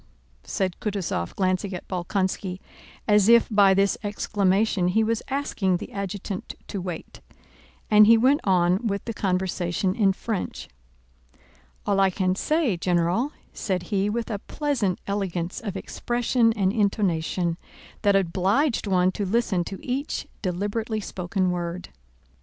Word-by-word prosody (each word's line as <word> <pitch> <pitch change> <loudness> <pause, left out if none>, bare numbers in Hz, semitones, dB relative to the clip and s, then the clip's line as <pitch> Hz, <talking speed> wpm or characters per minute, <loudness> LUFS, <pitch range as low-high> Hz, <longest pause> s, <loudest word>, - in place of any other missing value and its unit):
said 185 -2 -2
Kutúzov 190 - -3
glancing 185 0 0
at 180 - -8
Bolkónski 185 0 -2 0.5
as 210 0 +5
if 235 0 +6
by 200 -2 +5
this 195 0 +2
exclamation 205 -1 +1
he 220 +5 +3
was 225 0 0
asking 225 -9 0
the - - -8
adjutant 200 -1 -5
to 195 - -3
wait, 175 -3 -7 0.7
and 210 0 +8
he 230 +1 +8
went 265 +6 +3
on 185 +3 +2
with 200 -2 -2
the 230 - -3
conversation 185 -1 -1
in 200 -2 +3
French. 200 +1 -4 1.2
"All 200 -1 +2
I 195 -1 +5
can 185 0 0
say, 280 - +1
General," 175 - +1 0.2
said 185 -4 -2
he 200 +1 +2
with 230 +2 -2
a 205 - -2
pleasant 235 - -1
elegance 185 -3 -2
of 200 -4 -4
expression 240 +2 +1
and 195 -2 +1
intonation 180 -5 0 0.4
that 205 -2 +3
obliged 195 - +1
one 185 -1 +3
to 205 - -3
listen 200 -2 +1
to 195 - -6
each 270 +4 -2 0.2
deliberately 205 +4 -2
spoken 185 -1 -2
word. 175 0 -4
195 Hz, 135 wpm, -25 LUFS, 185-220 Hz, 1.2 s, and